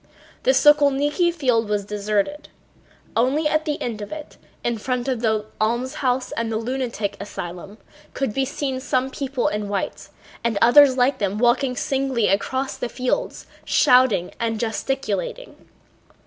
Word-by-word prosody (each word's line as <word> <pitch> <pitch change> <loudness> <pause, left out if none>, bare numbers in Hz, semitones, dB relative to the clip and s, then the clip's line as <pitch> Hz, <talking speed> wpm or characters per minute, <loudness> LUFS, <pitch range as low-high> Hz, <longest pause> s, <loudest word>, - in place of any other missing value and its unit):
The - - 0
Sokólniki 295 - +4
field 250 -9 +1
was 205 -1 -1
deserted. 210 +8 -2 0.7
Only 270 +7 +2
at 310 +1 +1
the 300 -1 -2
end 225 -3 -4
of 205 - -7
it, 310 -1 -8 0.3
in 235 -2 -1
front 250 +2 -2
of 255 -4 -1
the 220 -2 +1 0.2
almshouse 250 +3 0
and 230 0 -2
the 220 - 0
lunatic 230 -4 -3
asylum, 195 0 -7 0.4
could 270 -6 -1
be 270 - +1
seen 265 -1 -3
some 260 0 -1
people 270 -2 -2
in 210 -1 -2
white 200 -2 -3 0.3
and 230 -3 0
others 260 +3 +7
like 255 +3 +2
them 200 0 -1
walking 250 +3 +2
singly 265 -4 0
across 260 +7 -1
the 245 - -3
field 255 - -2 0.2
shouting 250 -9 +4
and 225 -2 -1
gesticulating. 240 - -3
250 Hz, 145 wpm, -22 LUFS, 215-275 Hz, 0.7 s, others